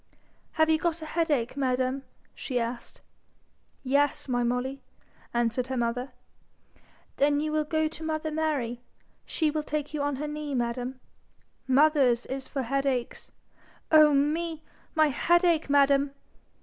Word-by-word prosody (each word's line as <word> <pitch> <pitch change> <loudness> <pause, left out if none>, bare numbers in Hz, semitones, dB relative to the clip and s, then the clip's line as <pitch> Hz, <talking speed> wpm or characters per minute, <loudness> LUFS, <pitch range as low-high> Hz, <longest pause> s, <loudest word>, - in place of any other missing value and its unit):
'Have 315 0 +3
you 315 0 +3
got 340 -1 -1
a - - -5
headache, 305 -8 0
madam?' 260 0 0 0.3
she 250 -3 -3
asked. 235 +1 -5 0.8
'Yes, 280 +2 +1
my 245 -2 0
Molly,' 250 +3 -1 0.5
answered 240 +1 0
her 260 -1 -3
mother. 245 +2 -1 1.1
'Then 290 +1 +3
you 305 +1 -1
will 305 0 0
go 315 +1 +1
to 310 0 -9
mother 315 0 -2
Mary. 285 -7 -1 0.5
She 315 -2 +1
will 305 0 -1
take 300 0 -4
you 300 - -2
on 285 -1 0
her 300 +3 -4
knee, 295 -1 -4
madam. 245 +1 -2 0.7
Mothers 265 -3 +4
is 265 0 -5
for 270 -3 -3
headaches. 270 -1 -2 0.6
Oh 305 -1 +7
me! 315 +3 0 0.3
my 310 -1 +4
headache, 340 +2 +2
madam!' 280 0 +3
280 Hz, 135 wpm, -27 LUFS, 255-310 Hz, 1.1 s, Oh